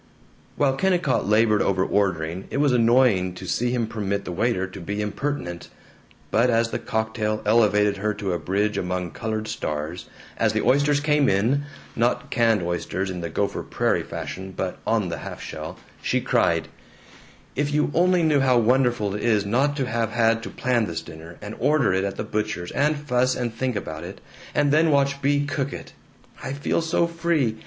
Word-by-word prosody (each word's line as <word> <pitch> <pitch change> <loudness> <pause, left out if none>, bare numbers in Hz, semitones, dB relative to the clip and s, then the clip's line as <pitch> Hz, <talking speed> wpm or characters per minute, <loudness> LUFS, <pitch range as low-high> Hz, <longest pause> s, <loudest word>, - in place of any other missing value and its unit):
While 135 -2 +1
Kennicott 175 - +1
labored 110 -1 +4
over 95 -1 +1
ordering 95 -3 -1
it - - -3
was 145 -1 +3
annoying 115 -6 +3
to - - -8
see 120 +1 0
him 120 -2 0
permit 100 -2 -3
the - - -4
waiter 100 +1 0
to 95 0 -9
be 105 +4 -4
impertinent, 105 -4 -3 0.6
but 120 +3 +3
as 115 -1 +2
the - - -2
cocktail 110 -1 -2
elevated 105 -2 +3
her 105 +2 0
to 100 -3 -2
a 85 - -1
bridge 100 +6 0
among 90 -1 -3
colored 110 +4 -3
stars, 75 +2 -4 0.3
as - - +2
the - - 0
oysters 145 +2 +3
came 150 -2 +3
in 115 +9 +1 0.3
not 120 +2 0
canned 115 -6 +3
oysters 90 +2 -2
in 90 -1 -5
the 85 - -4
Gopher 100 +5 -1
Prairie - - 0
fashion, 95 0 -6
but 95 -1 -3
on 110 -5 +1
the 85 - -4
half - - -7
shell - - -7 0.2
she - - +1
cried, - - +1 0.9
"If 145 +1 0
you 150 0 +1
only 180 0 +3
knew 155 -3 +3
how 130 -2 +4
wonderful 120 -3 +2
it 105 - -4
is 105 -3 +2
not 135 +8 +1
to 135 - 0
have 115 -2 -1
had 115 0 +2
to - - -6
plan 120 -4 0
this 80 -1 -4
dinner, 80 +1 -11
and 105 +1 -6
order 145 -10 +3
it 95 +1 +1
at 100 -1 -3
the - - -3
butcher's 105 -5 -3
and 150 +1 +1
fuss 130 -3 +1
and 120 -2 -2
think 125 +1 -2
about 80 -6 -5
it, - - -8 0.4
and 145 -1 +3
then 160 +2 +4
watch 140 -1 +2
Bea 145 +1 +2
cook 140 -1 -2
it! - - -8 0.5
I 135 - -3
feel 145 +4 0
so 165 +1 +1
free. 165 -9 0
115 Hz, 190 wpm, -24 LUFS, 100-140 Hz, 0.9 s, labored